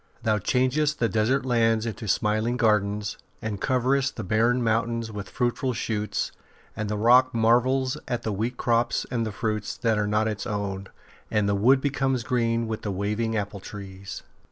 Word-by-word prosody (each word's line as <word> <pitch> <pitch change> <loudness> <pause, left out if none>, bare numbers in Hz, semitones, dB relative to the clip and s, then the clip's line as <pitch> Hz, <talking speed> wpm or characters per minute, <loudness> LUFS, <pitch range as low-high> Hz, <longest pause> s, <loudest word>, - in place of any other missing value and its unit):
'' 115 - -30
Thou 110 -2 +2
changest 135 +7 +1
the 115 - +2
desert 115 +5 +1
lands 115 -3 +2
into 115 0 -5
smiling 110 +4 +1
gardens, 105 -2 +1 0.2
and 105 -3 -4
coverest 135 +1 +1
the 110 - -5
barren 115 +5 +2
mountain 115 +1 +1
with 100 -2 -6
fruitful 125 +1 -1
shoots, 105 -2 -2 0.4
and 105 -1 -3
the 105 - -1
rock 125 +3 +5
marvels 125 +3 +3
at 120 -2 -2
the 110 - -1
wheat 115 +5 -2
crops 120 0 +1
and 115 -3 0
the - - -4
fruits 105 0 -3
that 110 -2 +1
are 105 - 0
not 105 +1 +1
its 105 -2 -3
own, 100 -2 -3 0.4
and 105 -2 +1
the 100 - +2
wood 125 +7 +4
becomes 135 -3 0
green 115 -2 0
with 110 -1 -4
waving 105 +3 -1
apple 100 0 -3
trees." 100 0 -8
115 Hz, 175 wpm, -26 LUFS, 105-125 Hz, 0.4 s, rock